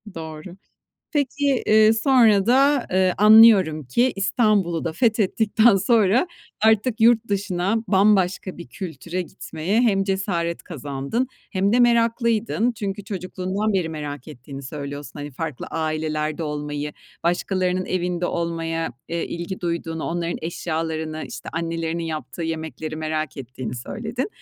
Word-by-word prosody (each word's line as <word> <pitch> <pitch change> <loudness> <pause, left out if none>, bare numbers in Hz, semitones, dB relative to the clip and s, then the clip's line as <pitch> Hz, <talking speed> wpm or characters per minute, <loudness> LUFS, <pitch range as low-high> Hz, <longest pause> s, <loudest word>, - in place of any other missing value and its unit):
Doğru. 160 +2 -8 0.6
Peki, 285 -2 +1
eee, 215 0 +6
sonra 225 -4 +4
da, 270 +2 +4
ııı, 185 0 +3
anlıyorum 210 -7 +7
ki, 240 - +2
İstanbul'u 195 -4 +1
da 165 - -2
fethettikten 220 +1 +3
sonra 215 - +3 0.4
artık 220 +2 +3
yurt 230 0 +4
dışına, 195 0 0
bambaşka 190 -2 +2
bir 170 - -8
kültüre 175 0 -5
gitmeye 175 +4 -2
hem 200 -5 +2
cesaret 190 -4 -1
kazandın 145 - -3 0.2
hem 195 0 +1
de 245 - +4
meraklıydın. 235 -1 +2
Çünkü 205 -3 -5
çocukluğundan 190 +2 -3
beri 185 -4 0
merak 145 -3 -6
ettiğini 135 0 -9
söylüyorsun, 145 0 -7
hani, 145 0 -6
farklı 155 0 -5
ailelerde 155 0 -2
olmayı, 150 -1 -4 0.3
başkalarının 185 +1 0
evinde 180 -1 -1
olmaya, 165 -3 -2 0.2
eee, 170 0 -2
ilgi 170 +2 -5
duyduğunu, 170 -2 -3
onların 170 0 -2
eşyalarını, 160 -1 -3
işte, 130 - -8
annelerinin 165 0 -2
yaptığı 160 +1 -5
yemekleri 160 -1 -4
merak 155 -2 -3
ettiğini 130 -2 -6
söyledin. 225 - -4
180 Hz, 125 wpm, -23 LUFS, 160-215 Hz, 0.6 s, anlıyorum